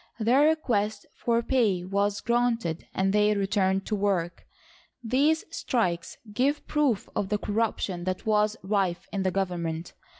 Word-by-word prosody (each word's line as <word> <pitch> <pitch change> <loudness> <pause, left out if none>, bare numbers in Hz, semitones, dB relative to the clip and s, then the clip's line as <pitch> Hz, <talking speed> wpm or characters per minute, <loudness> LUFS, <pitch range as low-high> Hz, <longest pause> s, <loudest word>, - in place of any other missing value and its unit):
Their 255 +7 +4
request 220 -10 0
for 235 0 0
pay 215 -9 +1
was 200 +1 0
granted, 235 -8 0
and 195 +1 0
they 210 0 +3
returned 195 -1 +1
to 215 - -1
work. 190 -4 -1 0.6
These 280 +7 +2
strikes 180 - -1 0.2
give 275 +6 +1
proof 285 -9 +1
of 195 - -1
the 210 - +1
corruption 205 -4 -2
that 185 0 -3
was 215 0 +2
rife 190 -3 0
in 200 - -1
the 190 - +1
government. 175 -3 -3
205 Hz, 140 wpm, -27 LUFS, 190-235 Hz, 0.6 s, Their